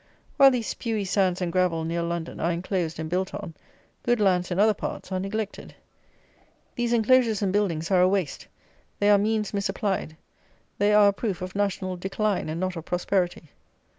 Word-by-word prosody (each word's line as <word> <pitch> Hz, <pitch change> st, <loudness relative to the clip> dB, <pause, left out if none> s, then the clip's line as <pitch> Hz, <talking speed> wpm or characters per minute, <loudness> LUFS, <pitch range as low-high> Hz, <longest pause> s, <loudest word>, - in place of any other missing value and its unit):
While 275 Hz, -2 st, +8 dB
these 245 Hz, -4 st, -1 dB
spewy 220 Hz, -4 st, -3 dB
sands 185 Hz, -1 st, +1 dB
and 175 Hz, -, -2 dB
gravel 180 Hz, -3 st, +1 dB
near 165 Hz, +1 st, -2 dB
London 170 Hz, -1 st, -4 dB
are 170 Hz, -, +1 dB
enclosed 175 Hz, -1 st, -2 dB
and 160 Hz, 0 st, -4 dB
built 185 Hz, +4 st, -2 dB
on, 200 Hz, -5 st, -7 dB, 0.5 s
good 240 Hz, -1 st, +1 dB
lands 185 Hz, -3 st, +2 dB
in 175 Hz, -, -2 dB
other 215 Hz, +1 st, +5 dB
parts 195 Hz, -, -6 dB
are 185 Hz, -, -1 dB
neglected. 205 Hz, +2 st, -5 dB, 1.0 s
These 240 Hz, -2 st, -1 dB
enclosures 230 Hz, -2 st, +3 dB
and 190 Hz, -1 st, 0 dB
buildings 180 Hz, -5 st, 0 dB
are 185 Hz, -1 st, +5 dB
a 180 Hz, -, +6 dB
waste; 190 Hz, -7 st, -2 dB, 0.5 s
they 205 Hz, 0 st, +3 dB
are 205 Hz, -, +6 dB
means 215 Hz, 0 st, 0 dB
misapplied; 195 Hz, -4 st, -2 dB, 0.6 s
they 205 Hz, +1 st, +3 dB
are 210 Hz, -1 st, +6 dB
a -, -, 0 dB
proof 195 Hz, -3 st, -3 dB
of 185 Hz, 0 st, -6 dB
national 195 Hz, -2 st, -1 dB
decline 195 Hz, 0 st, -1 dB
and 160 Hz, +2 st, -3 dB
not 185 Hz, 0 st, -2 dB
of 165 Hz, -, -6 dB
prosperity. 175 Hz, -2 st, -1 dB
190 Hz, 180 wpm, -25 LUFS, 175-210 Hz, 1.0 s, While